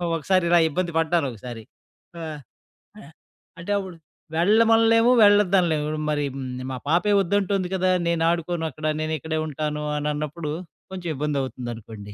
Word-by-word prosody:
ఒకసారి 185 +3 +1
ఇలా 175 0 +6
ఇబ్బంది 175 +2 -2
పడ్డాను 165 -1 +2
ఒకసారి. 115 0 -9 0.6
ఆహ్, 155 -2 -6 0.6
ఆహ్ 150 - -13 0.5
అంటే 175 +5 -5
అప్పుడు 190 -3 -5 0.4
వెళ్ళమనలేము, 225 +4 +4
వెళ్ళొద్దనలేము. 185 -7 +4
హ్మ్, 155 - -4
మరి 145 -1 0 0.5
మా 130 - -4
పాపే 190 +5 +3
వద్దంటుంది 195 0 0
కదా! 185 0 +2 0.2
నేను 170 -1 +1
ఆడుకోను 170 -1 -1
అక్కడ 155 +4 -8 0.2
నేను 155 0 -2
ఇక్కడే 160 +1 -3
ఉంటాను 150 0 -3
అని 150 +1 -1
అన్నప్పుడు, 150 +1 -4 0.4
కొంచెం 180 -3 -5
ఇబ్బంది 145 0 -1
అవుతుందనుకోండి. 115 -5 -7
165 Hz, 140 wpm, -24 LUFS, 150-185 Hz, 0.6 s, ఇలా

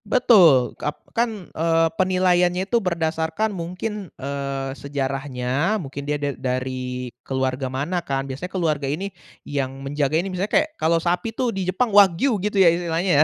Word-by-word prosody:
Betul, 185 - +5
kap 150 - -2 0.2
kan, 225 -6 -2
eee, 165 0 +2
penilaiannya 180 0 +2
itu 235 +3 +1
berdasarkan 170 +3 -1
mungkin, 185 +3 -5
eee, 140 0 -3
sejarahnya 135 +4 -2
mungkin 140 -4 -6
dia 150 - +1
da 145 -1 -2
dari 125 -1 -3
keluarga 130 0 -2
mana 150 +8 -2
kan. 135 -4 -2
Biasanya 140 +7 -6
keluarga 155 -7 -1
ini 190 +7 -3 0.3
yang 140 -2 -2 0.2
menjaga 145 +1 0
ini, 185 +3 -2
misalnya 190 +3 -2
kayak 310 - +2
kalau 165 +1 +3
sapi 175 +6 0
tuh 245 -3 0
di 190 -1 -2
Jepang, 215 +4 0
wagyu 205 +3 +5
gitu 210 +1 -1
ya 175 -4 +6
istilahnya 170 +1 -1
ya. - - +8
165 Hz, 160 wpm, -23 LUFS, 140-185 Hz, 0.3 s, ya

